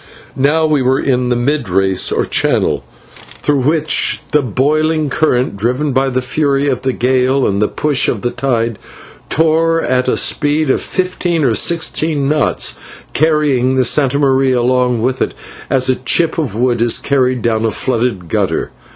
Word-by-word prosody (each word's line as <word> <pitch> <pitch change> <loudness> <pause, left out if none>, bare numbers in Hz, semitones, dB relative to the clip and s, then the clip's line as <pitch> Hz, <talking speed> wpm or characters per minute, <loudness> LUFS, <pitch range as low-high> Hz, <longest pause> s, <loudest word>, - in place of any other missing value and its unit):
Now 155 +4 +2
we 150 -3 +1
were 130 +1 +1
in 125 -2 0
the 125 - +1
mid 140 0 -1
race 95 0 +1
or - - 0
channel, - - 0 0.6
through 145 -2 +1
which 155 +3 +1
the 150 - +3
boiling 150 +5 0
current, 125 -8 0
driven 125 +8 -1
by 135 +1 +1
the 130 0 -2
fury 140 +1 0
of 130 -3 -1
the 130 - 0
gale 130 +2 +1
and 100 +1 -1
the 105 - +3
push 145 -3 0
of 110 - -2
the 120 - -1
tide, 115 -5 -2 0.5
tore 165 +1 +2
at 130 -4 0
a - - +1
speed 150 -1 +1
of - - 0
fifteen 180 -3 -1
or 125 -4 +2
sixteen 160 0 0
knots, 150 -2 0 0.4
carrying 145 -4 +1
the 130 - +2
/Santa 140 +1 +2
Maria/ 135 -2 +2
along 125 -1 +1
with 130 +1 -1
it - - -1 0.3
as 130 -1 +2
a 130 - +3
chip 155 +7 0
of 130 -11 -3
wood 120 0 0
is 120 -1 +2
carried 130 -3 0
down 110 -1 0
a 115 - +1
flooded 115 -6 -2
gutter. - - -1
130 Hz, 170 wpm, -15 LUFS, 125-150 Hz, 0.6 s, the